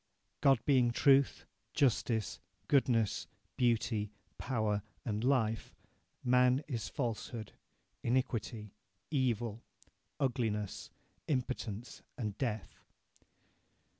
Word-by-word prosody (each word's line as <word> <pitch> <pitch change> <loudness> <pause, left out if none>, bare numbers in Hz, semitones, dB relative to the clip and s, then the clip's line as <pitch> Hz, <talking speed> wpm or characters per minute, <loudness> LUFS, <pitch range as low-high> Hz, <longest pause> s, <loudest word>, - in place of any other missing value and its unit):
God 135 -3 +6
being 130 -4 +5
truth, 135 +3 +4 0.3
justice, 115 -5 +1 0.3
goodness, 125 -8 +2 0.3
beauty, 115 -3 +1 0.3
power, 110 -5 0 0.2
and 110 -1 -1
life, 115 -5 +1 0.5
man 125 +2 +4
is 115 -8 -3
falsehood, 115 -3 -3 0.5
iniquity, 115 -4 -1 0.4
evil, 120 -5 0 0.6
ugliness, 110 -6 -1 0.4
impotence, 125 -5 -3 0.2
and 105 -5 -3
death. 110 -8 -3
120 Hz, 75 wpm, -34 LUFS, 110-130 Hz, 0.6 s, God